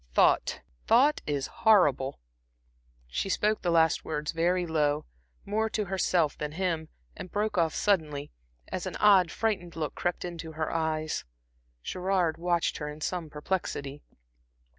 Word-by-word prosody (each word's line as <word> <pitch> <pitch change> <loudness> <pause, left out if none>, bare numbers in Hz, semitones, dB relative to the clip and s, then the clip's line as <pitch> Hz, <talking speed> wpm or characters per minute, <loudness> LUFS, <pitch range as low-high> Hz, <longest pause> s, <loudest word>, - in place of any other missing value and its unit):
Thought - - +3 0.3
thought 275 +6 +5
is 145 -2 -1 0.2
horrible." 145 - +4 0.9
She - - -3
spoke 210 +2 +1
the 175 - 0
last 165 -1 +3
words 150 -1 -3
very 175 +2 +1
low, 150 -3 +1 0.4
more 220 +2 0
to 215 -1 -1
herself 180 -4 +1
than 150 0 -4
him, 165 -3 -2 0.3
and 180 - -8
broke 210 0 -1
off 165 -3 +2
suddenly, 155 -8 0 0.4
as - - -3
an - - -5
odd, 195 -5 +5
frightened 190 -6 -2
look 155 -3 -3
crept 175 0 -2
into 165 -2 -6
her 155 0 -2
eyes. 155 -1 -1 0.6
Gerard 185 -3 0
watched 175 -1 0
her 150 -1 -4
in 150 +1 -8
some 170 0 -3
perplexity. 150 -3 -3
170 Hz, 140 wpm, -29 LUFS, 155-190 Hz, 0.9 s, thought